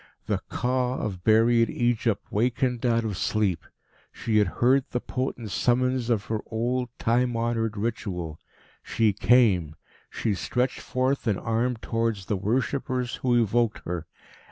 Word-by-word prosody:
The - - -1
Ka 125 0 0
of 95 -7 -4
buried 115 +2 +4
Egypt 120 -3 0
wakened 125 +2 0
out 115 -1 +2
of 105 -3 -2
sleep. 95 -4 0 0.5
She 110 -2 -1
had 105 - +3
heard 125 +7 +2
the 125 - -1
potent 125 -4 -4
summons 125 +1 +1
of 110 -4 +1
her 110 -1 -2
old, 125 +2 -1
time 120 +1 +1
honoured 115 -2 -1
ritual. 90 -7 -3 0.4
She 110 -2 +1
came. 100 -9 +3 0.3
She 110 - -1
stretched 125 +7 -1
forth 130 0 -1
an 105 -3 +2
arm 115 +2 -1
towards 115 -3 -2
the 105 - -1
worshippers 125 +4 -1
who 120 -2 +2
evoked 115 +1 0
her. 85 -2 -4
115 Hz, 140 wpm, -26 LUFS, 105-125 Hz, 0.5 s, buried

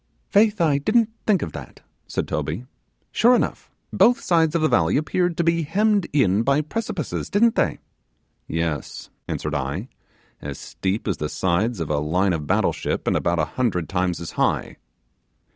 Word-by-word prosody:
'Faith, 210 0 +4
I 150 -4 +3
didn't 225 +9 +2 0.2
think 200 -5 +3
of 80 - -5
that,' - - -10 0.3
said - - -3
Toby; 75 - -3 0.5
'sure 245 +2 +5
enough, - - -2 0.2
both 245 +2 +5
sides 165 - +2
of 165 - +1
the - - +5
valley 85 - +2
appeared 175 +3 0
to 170 - +2
be 170 0 +2
hemmed 200 +4 +1
in 105 -8 +3
by 140 +5 +2
precipices, 220 +10 -4
didn't 225 +3 +4
they?' - - +1 0.7
'Yes,' 80 -3 -3 0.2
answered 75 - -3
I, 75 - -3 0.5
'as 70 -1 -6
steep 95 +4 -3
as 95 - 0
the 75 - -3
sides 95 +6 0
of 80 -2 -3
a 75 - +1
line 90 +6 +1
of 75 -3 -3
battle - - +2
ship, - - -3
and - - +1
about 85 0 +1
a 75 - +2
hundred 90 -1 -1
times 90 -2 -1
as 85 - -6
high. - - -1
115 Hz, 175 wpm, -23 LUFS, -, 0.7 s, sure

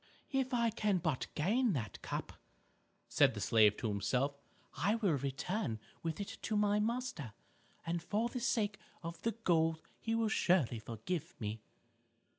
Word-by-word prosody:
"If 265 -1 +1
I 235 -2 +2
can 210 -3 +1
but 160 -6 -1
gain 220 +8 +2
that 115 -8 -4
cup," - - -4 0.7
said - - +4
the - - -3
slave 105 -2 +5
to 115 - -2
himself, 110 +7 +1 0.4
"I 205 +2 +2
will 205 -7 +2
return 140 - -2 0.2
with 165 +1 -3
it 200 - -5
to 215 - 0
my 210 0 +3
master, 230 - -2 0.5
and 170 0 -1
for 215 +6 0
the 250 +1 -4
sake 215 -5 +1 0.2
of 170 +1 -6
the 230 - 0
gold 165 -7 +2 0.2
he 225 0 -1
will 225 -1 +2
surely 170 - +3
forgive 115 - -4
me." 110 0 -3
180 Hz, 155 wpm, -35 LUFS, 135-225 Hz, 0.7 s, slave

